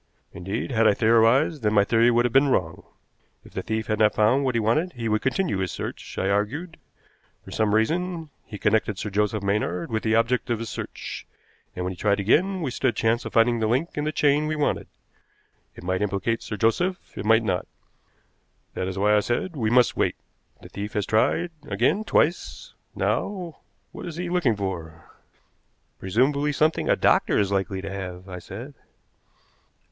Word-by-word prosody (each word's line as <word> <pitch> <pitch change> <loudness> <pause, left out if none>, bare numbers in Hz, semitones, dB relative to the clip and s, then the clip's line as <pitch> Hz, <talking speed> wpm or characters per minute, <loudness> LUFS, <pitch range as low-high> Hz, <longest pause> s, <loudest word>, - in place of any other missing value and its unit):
"Indeed, 95 +9 -4
had 115 -2 +3
I 100 - +4
theorized, 115 +8 +3
then 105 -1 +1
my 100 - +6
theory 115 +3 +3
would 120 0 +3
have 120 - -1
been 135 +2 +5
wrong. 90 -11 -1 0.6
If - - -16
the - - -3
thief 110 0 -2
had 110 0 -1
not 105 -1 +4
found 115 +6 +3
what 130 -3 0
he - - +3
wanted, 155 +12 +1
he 115 -2 -4
would 110 0 +1
continue 145 - 0
his 95 -1 -2
search, - - -7
I - - 0
argued. 120 - -1 0.7
For - - -11
some 110 -1 +1
reason 165 +7 -1
he 105 - -9
connected 105 -1 +1
Sir 105 +2 -4
Joseph 105 +1 0
Maynard 100 -1 -1
with 110 -1 0
the 110 0 +1
object 120 +3 +1
of 120 - +1
his 115 0 -6
search, - - -7 0.5
and, 90 - -3
when 90 - -2
he - - -7
tried 100 +2 +1
again, 180 - +2
we 135 - -2
stood 130 +1 +1
a - - -2
chance 115 +1 0
of - - -6
finding 115 0 +3
the 110 - +1
link 130 +10 +1
in 150 - -2
the 155 - -1
chain 150 0 +2
we 155 - -1
wanted. 150 -1 -1 0.9
It - - -11
might 95 +2 -1
implicate 105 +3 -1
Sir 105 - -5
Joseph, 175 - 0
it - - -5
might 110 +1 +4
not. 95 -4 -1 1.1
That 90 - -3
is 95 +1 -4
why 105 +2 +3
I - - +5
said 120 - -2
we 115 -6 0
must 125 +1 +4
wait. - - +1 0.5
The - - -11
thief 105 +3 -6
has 105 -4 -1
tried 165 - +1 0.2
again 215 +2 +1
twice. 185 - 0 0.2
Now, 180 -5 -2 0.3
what - - -8
is 165 - -6
he 175 0 -4
looking 160 -11 +2
for?" 85 -5 -6 0.9
"Presumably 140 +9 +1
something 155 +2 +1
a - - +5
doctor - - +3
is 100 -2 +1
likely 95 -1 -1
to 100 - -5
have," 95 -1 -7
I 90 -1 -7
said. 120 +11 -9
115 Hz, 195 wpm, -25 LUFS, 100-145 Hz, 1.1 s, my